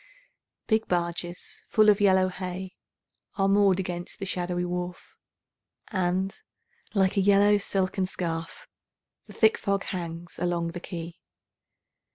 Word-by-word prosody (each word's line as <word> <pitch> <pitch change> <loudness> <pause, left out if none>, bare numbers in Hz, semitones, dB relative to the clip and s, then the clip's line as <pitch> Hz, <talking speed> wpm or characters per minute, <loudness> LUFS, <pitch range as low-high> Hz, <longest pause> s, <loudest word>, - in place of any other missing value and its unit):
Big 220 0 +1
barges 175 0 -3
full 215 -1 +4
of 210 0 +5
yellow 190 -2 +5
hay 185 0 -5 0.6
Are 195 -1 +3
moored 195 -1 +4
against 175 -2 -4
the 195 - -5
shadowy 180 -1 -2
wharf, 180 0 -5 0.8
And, 185 -1 0 0.6
like 190 0 +2
a - - +5
yellow 205 +1 +5
silken 190 -1 -1
scarf, 165 -3 -4 0.6
The - - -12
thick 220 -1 +4
fog 200 -2 0
hangs 170 -2 -6
along 175 -1 0
the 175 +1 -6
quay. 170 -1 -7
185 Hz, 125 wpm, -27 LUFS, 175-195 Hz, 0.8 s, of